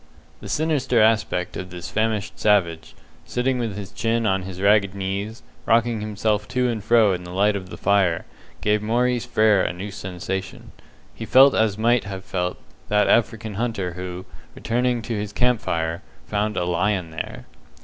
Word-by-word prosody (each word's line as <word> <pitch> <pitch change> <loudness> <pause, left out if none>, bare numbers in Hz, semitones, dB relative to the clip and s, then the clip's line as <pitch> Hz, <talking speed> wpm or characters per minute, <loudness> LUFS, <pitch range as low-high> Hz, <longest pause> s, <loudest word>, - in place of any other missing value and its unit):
The - - -9
sinister 150 -6 +1
aspect 110 -5 +2
of 90 - -6
this 85 -1 -8
famished 110 +1 -1
savage, 90 -6 +1 0.3
sitting 125 +1 -1
with 115 -5 -2
his 100 -1 -7
chin 115 +3 0
on 95 -2 +1
his 95 0 -8
ragged 100 -1 +3
knees, 100 +4 -4 0.2
rocking 115 -1 +2
himself 105 0 -1
to 125 +1 0
and 115 -4 -2
fro 110 -4 +4
in 90 -1 -4
the 90 - -9
light 100 +3 +2
of 95 -2 -6
the - - -8
fire, 95 -4 +2 0.4
gave 105 0 +2
Mr. - - -6
Maurice 120 +1 +1
Frere 110 -4 +4
a - - -1
new 95 +4 -7
sensation. 95 0 -6 0.4
He - - -7
felt 135 +1 +7
as 110 -2 +1
might 120 +2 +2
have 95 -1 -7
felt 90 -1 -2 0.3
that 105 0 +3
African 115 -1 +1
hunter 100 -5 -2
who, 90 +1 -6 0.3
returning 120 0 0
to 115 - -4
his 105 0 -3
camp 125 +1 +1
fire, 80 0 -2 0.2
found 105 +1 -1
a 90 - 0
lion 90 0 0
there. 80 - -6
105 Hz, 175 wpm, -23 LUFS, 95-115 Hz, 0.4 s, felt